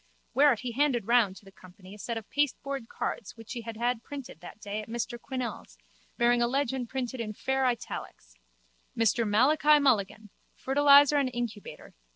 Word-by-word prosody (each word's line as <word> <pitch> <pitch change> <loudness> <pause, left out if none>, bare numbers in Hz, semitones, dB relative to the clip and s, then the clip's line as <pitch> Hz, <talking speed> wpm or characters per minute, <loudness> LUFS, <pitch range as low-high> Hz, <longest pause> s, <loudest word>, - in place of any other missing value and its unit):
Whereat 275 -4 +4
he 250 -2 -4
handed 255 -3 +1
round 230 -4 +3
to 200 - -15
the 195 - -14
company 185 0 -15
a 210 - -12
set 230 +2 -4
of 220 - -8
pasteboard 275 -3 -2
cards 230 +1 -5
which 225 +1 -9
he 240 - -5
had 225 -1 -8
had 240 0 -1
printed 275 0 -9
that - - -12
day 210 0 -5
at 215 - -12
Mr 235 +1 -4
Quinnell's 255 -3 -6 0.4
bearing 240 0 +3
a 235 - +3
legend 260 -2 -1
printed 260 -1 -4
in 215 -2 -4
fair 265 +4 0
italics: - - -5 0.6
_Mr 225 0 +2
Malachi 295 +7 +4
Mulligan. 215 -6 0 0.2
Fertiliser 285 +1 +5
and 275 -2 +1
Incubator. 240 -4 -6
240 Hz, 175 wpm, -28 LUFS, 215-265 Hz, 0.6 s, Fertiliser